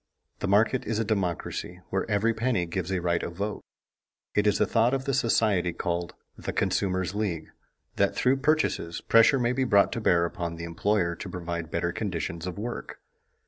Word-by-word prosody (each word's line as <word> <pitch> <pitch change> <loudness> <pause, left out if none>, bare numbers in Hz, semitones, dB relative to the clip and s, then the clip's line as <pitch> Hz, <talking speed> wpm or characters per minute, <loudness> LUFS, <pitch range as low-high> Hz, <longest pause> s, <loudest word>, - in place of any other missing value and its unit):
The - - -2
market 110 +6 +3
is 110 - 0
a 115 - 0
democracy 90 -3 -2
where 95 +3 -1
every 105 +2 +2
penny 115 -5 0
gives 90 +1 -3
a 95 -2 0
right 85 -1 +1
of 85 - -5
vote. 100 +3 -3 0.7
It 105 0 +2
is 105 - +3
the - - +3
thought 115 +3 +2
of 135 0 -3
the 135 - 0
society 105 -8 +2
called 85 0 -3 0.2
"The - - -5
Consumers' 95 -2 0
League" 95 -7 -2 0.5
that 100 0 +2
through 130 +2 +3
purchases, 135 - 0
pressure 115 +4 +5
may 120 -1 +1
be 130 +1 +1
brought 100 -5 +4
to 115 - -3
bear 85 -5 +3
upon 85 -1 -4
the 85 - -7
employer 85 +1 0
to 95 - -6
provide 85 -2 -4
better 85 +1 -1
conditions 85 -3 -3
of 90 - -5
work. 120 +4 -5
100 Hz, 185 wpm, -27 LUFS, 85-115 Hz, 0.7 s, pressure